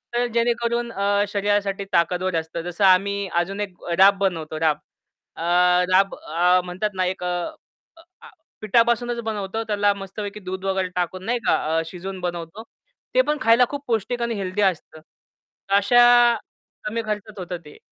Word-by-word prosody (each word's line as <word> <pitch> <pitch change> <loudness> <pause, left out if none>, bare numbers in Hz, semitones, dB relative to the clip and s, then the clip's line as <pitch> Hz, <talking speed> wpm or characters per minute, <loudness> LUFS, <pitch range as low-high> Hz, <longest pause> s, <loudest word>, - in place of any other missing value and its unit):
तर 245 0 +2
जेणेकरून 235 0 0
अ, 200 0 +1
शरीरासाठी 200 -1 -1
ताकदवर 180 +1 +1
असतं, 160 +1 -6
जसं 175 +3 -3
आम्ही 200 +1 +3 0.2
अजून 195 +3 -7
एक 185 - -24 0.3
राब 195 +1 +7
बनवतो 160 -5 -2
राब. 155 -2 +2 0.6
अ, - - -6 0.5
राब 195 +1 +4
अ, 180 +3 +2
म्हणतात 185 +4 -3
ना 185 0 0
एक 180 - -9
अ, - - -2 0.7
अ, - - -16 0.2
आ 470 - -12 0.3
पिठापासूनच 235 +2 +2
बनवतो 215 0 -3
त्याला 205 -2 +2
मस्तपैकी 200 +1 -7
दूध 190 +1 -5
वगैरे 190 -1 0
टाकून 185 +1 -2
नाही 240 +2 0
का - - +4 0.2
अ, - - +1
शिजवून 185 +2 -7
बनवतो. 175 +3 -5 0.5
ते - - +5
पण 300 -6 -1
खायला 230 +2 +5
खूप 285 0 -6
पौष्टिक 235 +2 -1
आणि 235 -1 -1
हेल्दी 195 0 -2
असतं. 170 -4 -1
तर 195 +4 -10
अशा 240 +5 +5 0.8
कमी 225 +2 -2
खर्चात 210 0 -5
होतं 180 -1 -5
ते. 150 - -14
200 Hz, 160 wpm, -23 LUFS, 185-225 Hz, 0.8 s, राब